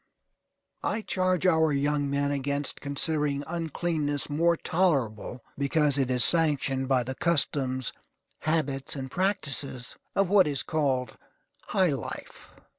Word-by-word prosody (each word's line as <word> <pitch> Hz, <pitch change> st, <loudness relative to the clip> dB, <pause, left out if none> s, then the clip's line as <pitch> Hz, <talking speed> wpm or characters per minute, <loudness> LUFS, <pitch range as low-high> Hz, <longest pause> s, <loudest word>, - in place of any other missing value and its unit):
I 220 Hz, -, -1 dB
charge 185 Hz, -2 st, 0 dB
our 160 Hz, -3 st, +4 dB
young 145 Hz, 0 st, 0 dB
men 140 Hz, 0 st, 0 dB
against 140 Hz, 0 st, -2 dB
considering 145 Hz, 0 st, 0 dB
uncleanness 160 Hz, -3 st, -2 dB
more 170 Hz, +3 st, +3 dB
tolerable, 130 Hz, -, 0 dB, 0.2 s
because 145 Hz, 0 st, +2 dB
it 130 Hz, -2 st, +1 dB
is 125 Hz, -2 st, +3 dB
sanctioned 140 Hz, -5 st, +2 dB
by 130 Hz, -2 st, +2 dB
the 130 Hz, +2 st, -4 dB
customs, 130 Hz, -5 st, +1 dB, 0.5 s
habits, 145 Hz, -4 st, -1 dB
and 130 Hz, -2 st, -6 dB
practices 145 Hz, -9 st, -2 dB, 0.2 s
of 195 Hz, -1 st, +3 dB
what 190 Hz, -2 st, +5 dB
is 140 Hz, -2 st, -1 dB
called 135 Hz, -5 st, 0 dB, 0.5 s
high 185 Hz, -4 st, +2 dB
life. 130 Hz, -, -7 dB
145 Hz, 120 wpm, -27 LUFS, 135-165 Hz, 0.5 s, what